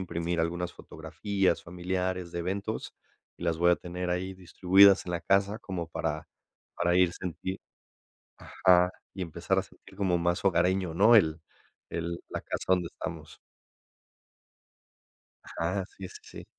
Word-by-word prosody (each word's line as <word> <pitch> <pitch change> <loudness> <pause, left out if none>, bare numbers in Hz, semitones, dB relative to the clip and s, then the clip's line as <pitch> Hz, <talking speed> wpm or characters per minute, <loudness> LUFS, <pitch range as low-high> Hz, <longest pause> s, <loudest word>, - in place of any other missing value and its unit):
imprimir 85 -2 -2
algunas 85 +1 -2
fotografías 100 -4 -2
familiares 90 0 -3
de 85 - -3
eventos 100 +5 -4 0.4
y 85 - -6
las 85 -1 +1
voy 85 +1 +5
a - - +2
tener 90 0 -5
ahí 95 +2 -2
distribuidas 95 +2 +5
en 90 - -3
la 85 - -1
casa 100 +2 +2
como 90 -7 -5
para 75 -1 -3 0.5
para 85 +1 +3
ir, 90 -2 +4
sentir 95 +1 -5 0.8
ajá, 90 0 +3 0.2
y 95 - -6
empezar 85 -4 -1
a - - -2
sentir - - -18
como 95 -3 +1
más 85 +2 0
hogareño, 90 -1 +2
¿no?, 110 +5 +6
el 80 -6 +4 0.5
el 85 0 -3
la - - -4
casa - - -5
donde 90 -2 +3
estamos. - - -7 2.2
Ajá, 90 +3 -1
sí, 95 -1 -7
sí, - - -12
sí. - - -11
90 Hz, 145 wpm, -29 LUFS, 85-95 Hz, 2.2 s, no